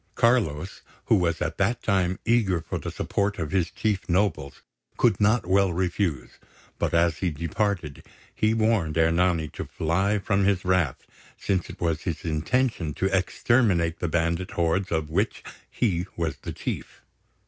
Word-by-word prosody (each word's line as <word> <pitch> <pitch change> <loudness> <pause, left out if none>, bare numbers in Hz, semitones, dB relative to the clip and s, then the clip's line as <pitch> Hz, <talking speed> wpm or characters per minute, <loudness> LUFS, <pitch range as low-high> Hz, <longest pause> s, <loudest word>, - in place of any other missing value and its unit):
Carlos, 95 -9 +1 0.2
who - - +4
was 85 -2 +1
at 80 -1 -4
that 110 +5 +1
time 95 -2 +1
eager 110 -7 +2
for 80 - -5
the - - -5
support 100 0 -1
of 80 -4 -3
his 95 -3 +1
chief 105 -4 -2
nobles, 90 -6 0 0.3
could - - +2
not 110 +2 +3
well 95 +1 +3
refuse; 85 -5 -2 0.4
but, - - 0
as 85 -1 +2
he 95 - 0
departed, 85 -1 -2 0.3
he 110 - +1
warned 110 -9 +1
Ernani 85 0 +2
to - - -6
fly 95 +6 0
from 100 0 +1
his 95 -2 +1
wrath, 90 -8 +1 0.3
since 95 -2 -1
it - - -10
was 80 -2 0
his 85 -4 -4
intention 80 - 0
to 95 0 0
exterminate 95 -3 +2
the 85 - -1
bandit 85 +2 0
hordes 85 +3 0
of 80 -2 -1
which 100 +7 -1 0.3
he 90 -5 0
was 85 -2 -2
the - - -7
chief. - - -6
90 Hz, 160 wpm, -25 LUFS, 80-100 Hz, 0.4 s, who